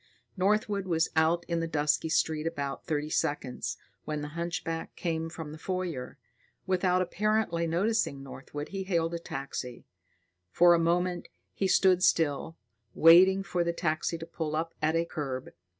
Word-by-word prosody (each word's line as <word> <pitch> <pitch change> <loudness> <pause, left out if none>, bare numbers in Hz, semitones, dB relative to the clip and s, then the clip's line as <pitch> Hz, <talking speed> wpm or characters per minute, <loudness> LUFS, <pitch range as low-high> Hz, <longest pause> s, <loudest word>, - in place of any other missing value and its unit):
Northwood 200 0 +1
was 165 -2 +1
out 160 +2 +2
in 170 -1 -1
the 165 - -1
dusky 150 0 +1
street 155 0 +1
about 140 -4 -4
thirty 150 -1 -1
seconds, 140 -5 -2 0.3
when 150 -1 -3
the 150 - -5
hunchback 170 0 -4
came 165 -2 -2
from 160 -2 -7
the 155 - -9
foyer. 180 -8 -4 0.5
Without 185 -1 +2
apparently 195 -3 0
noticing 170 -5 0
Northwood, 140 +2 -8
he 195 -1 -4
hailed 170 -3 0
a 170 - -2
taxi. 135 -5 -6 0.6
For 175 - +6
a 170 - +3
moment, 175 +1 0 0.3
he 195 - 0
stood 185 -1 +4
still, 165 -2 +1 0.4
waiting 185 +4 +7
for 175 -1 -1
the 170 0 -1
taxi 165 0 -1
to 165 - -7
pull 160 -2 -4
up 165 +1 -2
at 155 +1 +1
the 165 0 +2
curb. 135 -6 -5
165 Hz, 155 wpm, -29 LUFS, 155-180 Hz, 0.6 s, waiting